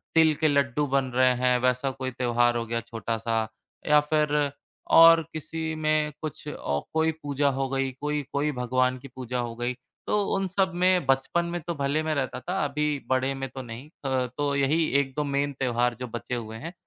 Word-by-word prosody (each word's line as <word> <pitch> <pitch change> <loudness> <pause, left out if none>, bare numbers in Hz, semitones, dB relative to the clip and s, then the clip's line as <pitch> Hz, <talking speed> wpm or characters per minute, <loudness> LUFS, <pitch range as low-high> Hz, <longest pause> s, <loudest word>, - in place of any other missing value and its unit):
तिल 160 -1 +6
के 155 - +5
लड्डू 140 0 +2
बन 135 0 +1
रहे 130 0 +5
हैं 125 0 +4
वैसा 125 +2 +1
कोई 130 0 -4
त्यौहार 120 -1 +2
हो 115 - -2
गया 115 +1 -2
छोटा 115 0 -4
सा, 115 -1 -1 0.4
या 150 0 +6
फिर 150 -1 +1 0.4
और 165 0 +9
किसी 160 +1 -4
में 155 -1 +1
कुछ 155 -3 -6
औ 70 0 -2
कोई 160 0 +2
पूजा 145 0 +1
हो 135 0 -1
गई, 135 -1 -1
कोई 150 +3 -2
कोई 145 +2 +1
भगवान 130 0 0
की 140 - -10
पूजा 125 -1 -3
हो 120 -1 -3
गई। 120 +1 -2 0.3
तो 210 - +2 0.2
उन 195 -1 0
सब 190 0 +1
में 180 -3 +3
बचपन 135 +6 +1
में 175 0 -3
तो 170 - -1
भले 140 +2 0
मैं 155 -1 -1
रहता 135 -2 -2
था 180 +7 -3
अभी 150 +1 0 0.2
बड़े 130 +1 +1
में 135 0 -4
तो 130 - -7
नहीं। 120 +5 -9 0.2
त 130 -2 0
तो 145 -1 0
यही 145 +4 +2
1-2 140 +2 -1
मेन 140 0 -1
त्योहार 120 -1 +1
जो 125 - -4
बचे 125 +1 -4
हुए 110 -1 -6
हैं 165 +9 -7
135 Hz, 205 wpm, -26 LUFS, 125-150 Hz, 0.4 s, और